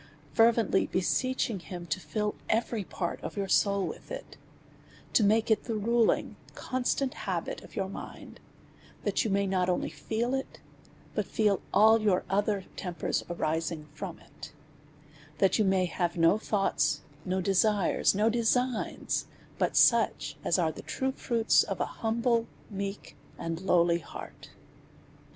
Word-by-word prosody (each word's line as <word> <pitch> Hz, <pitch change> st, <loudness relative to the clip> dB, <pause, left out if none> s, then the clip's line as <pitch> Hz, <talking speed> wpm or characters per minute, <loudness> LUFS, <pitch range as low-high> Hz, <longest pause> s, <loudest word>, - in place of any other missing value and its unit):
Fervently 225 Hz, -3 st, +4 dB
beseeching 230 Hz, +3 st, 0 dB
him 175 Hz, 0 st, -8 dB
to 165 Hz, +2 st, -2 dB
fill 210 Hz, +2 st, -2 dB, 0.2 s
every 225 Hz, -1 st, 0 dB
part 175 Hz, -1 st, -4 dB
of -, -, -6 dB
your 200 Hz, -1 st, -1 dB
soul 200 Hz, -1 st, +2 dB
with -, -, -7 dB
it, -, -, -7 dB, 0.8 s
to 220 Hz, -, +5 dB
make 220 Hz, +2 st, +3 dB
it 215 Hz, -, +2 dB
the 230 Hz, -, -2 dB
ruling, 230 Hz, +2 st, +1 dB, 0.2 s
constant 255 Hz, +1 st, -1 dB
habit 185 Hz, -5 st, -3 dB
of -, -, -14 dB
your 195 Hz, -3 st, -1 dB
mind, 195 Hz, -, -9 dB, 0.6 s
that -, -, +1 dB
you 225 Hz, -, -1 dB
may 200 Hz, 0 st, +2 dB
not 185 Hz, -1 st, +1 dB
only 180 Hz, -, 0 dB
feel 235 Hz, +3 st, -2 dB
it, 270 Hz, 0 st, -4 dB, 0.5 s
but -, -, -1 dB
feel 210 Hz, -3 st, +1 dB
all 220 Hz, +1 st, +6 dB
your 200 Hz, -4 st, +2 dB
other 200 Hz, -1 st, +1 dB
tempers 180 Hz, -2 st, -2 dB
arising 160 Hz, -2 st, -2 dB
from 170 Hz, +2 st, -6 dB
it; -, -, -12 dB, 0.9 s
that 195 Hz, +3 st, +3 dB
you -, -, +5 dB
may 190 Hz, -1 st, +3 dB
have 175 Hz, -1 st, -2 dB
no 165 Hz, +5 st, +4 dB
thoughts, 195 Hz, -9 st, +1 dB, 0.2 s
no 185 Hz, +2 st, -1 dB
desires, 195 Hz, +1 st, +2 dB
no 210 Hz, +2 st, +3 dB
designs, 240 Hz, +1 st, 0 dB, 0.3 s
but -, -, +1 dB
such -, -, +4 dB
as -, -, +2 dB
are 165 Hz, -3 st, +2 dB
the -, -, -9 dB
true 265 Hz, 0 st, -2 dB
fruits 235 Hz, -4 st, +2 dB
of -, -, -3 dB
an -, -, +1 dB
hum 225 Hz, +1 st, -3 dB
ble, 235 Hz, -2 st, +2 dB, 0.2 s
meek, 200 Hz, 0 st, -5 dB, 0.2 s
and 165 Hz, +1 st, -4 dB
lowly 170 Hz, -2 st, +3 dB
heart. -, -, -10 dB
200 Hz, 150 wpm, -29 LUFS, 180-225 Hz, 0.9 s, all